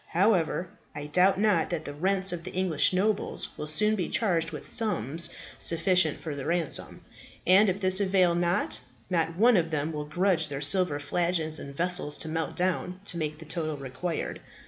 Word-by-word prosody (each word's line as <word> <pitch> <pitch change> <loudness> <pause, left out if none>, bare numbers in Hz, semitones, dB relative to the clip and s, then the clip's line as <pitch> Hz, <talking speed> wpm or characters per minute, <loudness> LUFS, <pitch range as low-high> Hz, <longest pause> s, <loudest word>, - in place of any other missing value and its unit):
However, 180 -2 +1 0.3
I 145 -1 -6
doubt 180 +6 +2
not 210 -1 +2
that 165 -3 -4
the 145 - -6
rents 190 +5 +2
of 170 -1 -6
the 185 - -7
English 175 -6 +2
nobles 200 +3 -1
will 150 - -6
soon 210 +8 +2
be 180 -5 -3
charged 170 -7 0
with 155 -3 -9
sums 165 - +1 0.3
sufficient 170 -1 +3
for 155 -3 -6
the 140 - -6
ransom; 170 -3 +2 0.4
and 190 +3 +5
if 185 +2 -2
this 185 -1 +2
avail 185 -3 +2
not, 175 +3 0 0.3
not 165 -2 0
one 230 +6 +4
of 165 -2 0
them 155 0 -2
will 150 -1 -5
grudge 170 +1 0
their 140 -2 -5
silver 150 +1 +2
flagons 160 +1 -1
and 140 0 -10
vessels 175 -4 +1
to 160 - -4
melt 160 +1 -3
down 180 0 -1
to 175 - +2
make 155 -1 -3
the 160 - -12
total 155 -2 -3
required. 140 +5 -5
170 Hz, 185 wpm, -27 LUFS, 155-185 Hz, 0.4 s, and